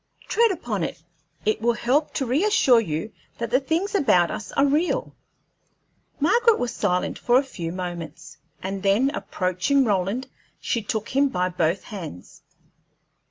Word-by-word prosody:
Tread 465 0 +3
upon 240 - -3
it; 160 - -5 0.4
it 215 0 +1
will 235 +1 +3
help 265 +6 +1
to 270 - 0
reassure 275 - +4
you 165 0 -3 0.3
that 235 -1 -4
the 255 - +4
things 325 +8 -1
about 180 - +3
us 210 - -6
are 275 - +3
real." 340 - 0 1.1
Margaret 435 +9 +4
was 245 - -2
silent 180 0 -1
for 245 +1 +3
a 270 - +3
few 175 -11 -6
moments, 170 -3 -7 0.3
and 195 +1 -3
then, 205 +8 +3
approaching 185 - 0
Roland, 205 +5 0 0.3
she 235 - -1
took 215 +1 -3
him 275 +1 +2
by 180 -4 0
both 170 0 0
hands. 165 - -9
230 Hz, 150 wpm, -24 LUFS, 185-280 Hz, 1.1 s, reassure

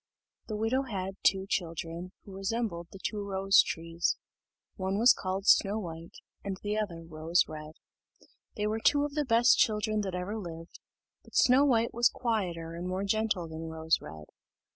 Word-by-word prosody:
The 215 - -3
widow 225 +5 +1
had 195 -7 -4
two 190 -1 +3
children, 170 0 -3
who 195 - -11
resembled 195 -3 -2
the - - -10
two 210 +2 -3
rose 195 0 +4
trees: 165 +1 -2 0.6
one 190 +1 -2
was 235 +3 +7
called 190 +1 -3
Snow 205 0 +5
white, 165 -4 -7 0.3
and 195 -1 -4
the 205 0 -1
other 190 -6 -3
Rose 165 +2 +1
red. 155 0 -8 0.8
They 210 - -1
were 215 +1 -1
two 285 +5 +3
of 290 - -5
the 300 0 0
best 240 +1 +5
children 215 0 +2
that 190 -3 -3
ever 190 +5 -3
lived; 165 -3 -9 0.4
but - - -16
Snow 260 +2 +5
white 235 -4 +2
was 240 +1 +4
quieter 180 -9 -2
and 175 +2 -5
more 185 +1 -2
gentle 205 -4 0
than 160 0 -6
Rose 160 0 +1
red. 75 0 -10
195 Hz, 170 wpm, -30 LUFS, 170-220 Hz, 0.8 s, was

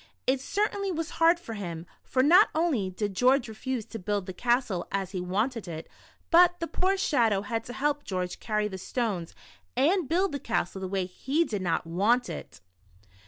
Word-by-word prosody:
It 260 0 +2
certainly 400 +4 -1
was 330 -1 -3
hard 335 +1 +6
for 235 -9 -7
him, 170 -5 -5 0.2
for 255 0 +1
not 335 +6 +7
only 305 - +1
did 200 +2 -3
George 255 +3 +3
refuse 230 +1 -4
to 225 - -8
build 200 0 -2
the 185 - -6
castle 235 -4 0
as 195 -1 -2
he 185 -3 -3
wanted 210 +4 -1
it, 160 -1 -6 0.4
but 355 +1 +6
the 335 - -1
poor 375 +3 0
Shadow 225 - +2
had 225 +1 -2
to 245 - -7
help 290 +2 0
George 180 -2 -3
carry 210 -1 0
the 190 -2 -7
stones 200 -6 -3 0.4
and 315 +3 +2
build 370 +3 +2
the 285 - -3
castle 200 -5 -2
the 190 - -3
way 190 -1 -1
he 275 - 0
did 205 -8 -3
not 170 -3 0
want 210 +9 +2
it. - - -9
230 Hz, 190 wpm, -28 LUFS, 190-295 Hz, 0.4 s, not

